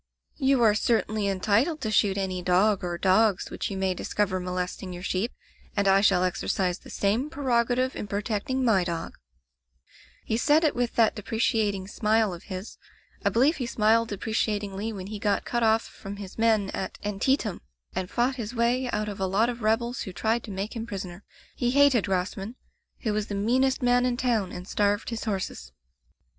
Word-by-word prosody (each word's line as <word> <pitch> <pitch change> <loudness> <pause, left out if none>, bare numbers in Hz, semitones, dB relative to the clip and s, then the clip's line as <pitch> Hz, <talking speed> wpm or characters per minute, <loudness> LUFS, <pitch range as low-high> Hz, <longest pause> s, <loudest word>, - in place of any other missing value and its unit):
'You 270 -3 +3
are 215 -2 +6
certainly 215 -1 +1
entitled 215 - +1
to 220 -4 -2
shoot 200 -1 +3
any 185 -2 -2
dog 185 +3 +3
or 175 -1 -2
dogs 195 +2 +2
which - - -3
you 195 - -4
may 190 -1 +1
discover 185 +1 -1
molesting 180 +1 -4
your 175 0 -7
sheep, 195 +5 -1 0.5
and 200 0 +2
I 195 0 +5
shall 195 -3 +4
exercise 180 0 -1
the - - -14
same 220 +9 0
preroga 245 -5 +1
tive 255 +1 0
in - - -5
protecting 210 +6 -1
my 205 -6 +4
dog/ 170 -2 -4 1.1
"He 220 - 0
said 295 +6 +4
it 305 - +3
with 245 -1 -1
that 225 -2 +4
deprecating 210 -2 0
smile 215 -1 +1
of 170 - -10
his 185 +1 -7 0.2
— - - -31
I - - +3
believe 270 +8 +3
he 250 -4 -3
smiled 225 0 +3
deprecatingly 210 0 -2
when 190 -4 -6
he 210 +1 -6
got 205 -1 0
cut 240 - -1
off 225 0 +3
from 195 +1 -9
his 200 -2 -9
men 220 -3 +2
at 190 - -4
Antie 210 +7 +1
tam, 215 -9 -5 0.3
and 185 0 -3
fought 250 +2 0
his 230 0 -5
way 245 +2 +1
out 215 -2 -1
of 205 -2 -6
a 190 - 0
lot 210 +5 +2
of 240 -1 -5
rebels 235 +3 0
who 190 - -5
tried 225 +5 0
to - - -10
make 195 +4 -4
him 225 0 -4
prisoner. 190 -3 -6 0.3
He 245 - 0
hated 275 -4 +4
Grosman, 195 +4 -2 0.5
who 215 -4 -1
was 210 0 -1
the 205 - -4
meanest 255 +6 +1
man 245 0 +3
in 245 -1 -1
town 225 -7 0
and 180 +1 -8
starved 205 +3 0
his 230 0 -4
*horses. 190 - -3
210 Hz, 195 wpm, -26 LUFS, 195-235 Hz, 1.1 s, are